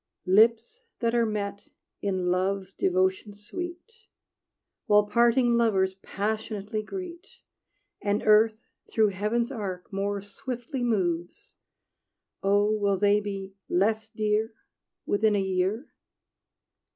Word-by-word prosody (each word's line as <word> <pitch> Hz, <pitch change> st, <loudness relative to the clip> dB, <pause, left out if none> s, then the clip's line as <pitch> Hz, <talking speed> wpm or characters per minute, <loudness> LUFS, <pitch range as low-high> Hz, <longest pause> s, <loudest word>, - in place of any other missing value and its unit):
Lips 225 Hz, -, +3 dB, 0.2 s
that 230 Hz, -1 st, 0 dB
are 235 Hz, -1 st, +3 dB
met 200 Hz, -1 st, -4 dB, 0.3 s
in 185 Hz, -3 st, 0 dB
love's 190 Hz, +1 st, -1 dB
Devotion 190 Hz, +3 st, 0 dB
sweet, 350 Hz, -, -8 dB, 0.8 s
While 210 Hz, 0 st, +5 dB
parting 235 Hz, +3 st, +3 dB
lovers 200 Hz, -5 st, +2 dB
passionately 215 Hz, +1 st, -3 dB
greet, 360 Hz, -, -7 dB, 0.7 s
And 205 Hz, 0 st, 0 dB
earth 215 Hz, +1 st, +5 dB, 0.3 s
through 220 Hz, -2 st, +3 dB
heaven's 215 Hz, +6 st, -1 dB
arc 195 Hz, -5 st, -6 dB
more 200 Hz, +1 st, -1 dB
swiftly 245 Hz, +6 st, -6 dB
moves 175 Hz, -7 st, -2 dB, 0.9 s
Oh, 205 Hz, +2 st, +3 dB
will 200 Hz, -2 st, +1 dB
they 205 Hz, +1 st, +4 dB
be 195 Hz, -2 st, -6 dB, 0.2 s
less 220 Hz, +4 st, +1 dB
dear 215 Hz, +1 st, -1 dB, 0.5 s
Within 210 Hz, +1 st, +2 dB
a -, -, +2 dB
year? 190 Hz, +6 st, -1 dB
210 Hz, 105 wpm, -27 LUFS, 195-230 Hz, 0.9 s, While